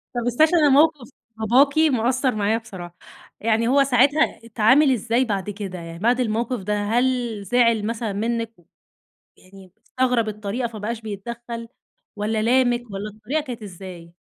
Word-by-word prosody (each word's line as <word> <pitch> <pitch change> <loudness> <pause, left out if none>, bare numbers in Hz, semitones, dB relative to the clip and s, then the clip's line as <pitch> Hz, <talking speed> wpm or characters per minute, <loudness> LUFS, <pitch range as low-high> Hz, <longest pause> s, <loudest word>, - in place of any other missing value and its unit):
طب 240 - -1
استني 245 +6 +4
عشان 315 -4 +3
موقف 300 -3 +3 0.3
باباكِ 260 +7 +3
مأثّر 255 -4 +2
معايا 210 +2 +1
بصراحة، 185 -6 -10 0.4
يعني 225 +1 +1
هو 275 +2 +4
ساعتها 275 +4 +2
اتعامل 240 +6 +4
إزاي 240 +2 +1
بعد 205 -3 -3
كده 195 -3 -6
يعني، 165 0 -9
بعد 240 +4 +2
الموقف 235 0 -1
ده 210 - -1
هل 240 -1 0
زعل 230 -1 +2
مثلًا 225 -2 -3
منِك؟ 230 +2 -2 0.8
يعني 190 -1 -17
استغرب 250 -3 0
الطريقة 215 +3 -3
فما 220 -2 -9
بقاش 220 +2 -4
بيتدخّل، 230 +2 -7 0.5
والّا 215 +1 -1
لامِك 245 0 +2
والّا 195 +2 -5
الطريقة 220 +9 -3
كانت 245 -6 -7
إزاي؟ 180 -3 -10
230 Hz, 145 wpm, -22 LUFS, 210-250 Hz, 0.8 s, استني